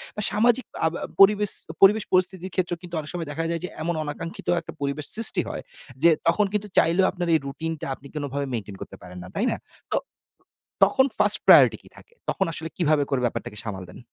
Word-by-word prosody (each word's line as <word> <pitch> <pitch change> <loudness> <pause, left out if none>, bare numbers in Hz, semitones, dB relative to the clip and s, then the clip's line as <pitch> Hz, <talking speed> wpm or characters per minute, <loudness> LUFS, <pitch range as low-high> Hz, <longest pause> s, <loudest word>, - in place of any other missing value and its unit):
বা 210 - -3
সামাজিক 235 +4 +2 0.2
আব 160 - +1
আ - - -2
পরিবেস 205 +1 +6 0.3
পরিবেশ-পরিস্থিতির 190 -2 +3
ক্ষেত্রেও 180 -2 -1
কিন্তু 175 -1 -8
অনেক 150 - -7
সময় 170 -3 -4
দেখা 165 +3 -3
যায় 170 -1 -2
যে 180 - -3
এমন 170 +1 -1
অনাকাঙ্ক্ষিত 165 +3 -7
একটা - - -9
পরিবেশ 140 +1 -2
সৃষ্টি 225 0 +3
হয়। - - -5 0.4
যে 170 - +8 0.2
তখন 210 +5 +3
কিন্তু 210 0 -1
চাইলেও 170 +4 +4
আপনার 175 -1 -4
এই 160 - +4
রুটিনটা 160 +3 -5
আপনি 140 - -15
কোনভাবে 145 -1 -3
মেইনটেইন 105 -4 -5
করতে - - -8
পারেন 90 0 -11
না, - - -10
তাই 225 - 0
না? - - -2 0.3
তো - - +2 0.9
তখন 265 -1 +4
1st 210 0 +4
প্রায়োরিটি - - +8
কী - - -17
থাকে? - - -17 0.2
তখন 195 - 0
আসলে 160 0 -5
কীভাবে 155 -4 +2
করে 135 -3 0
ব্যাপারটাকে 110 -2 -4
সামাল 100 -5 -6
দেন? 90 - -12
170 Hz, 200 wpm, -24 LUFS, 145-195 Hz, 0.9 s, যে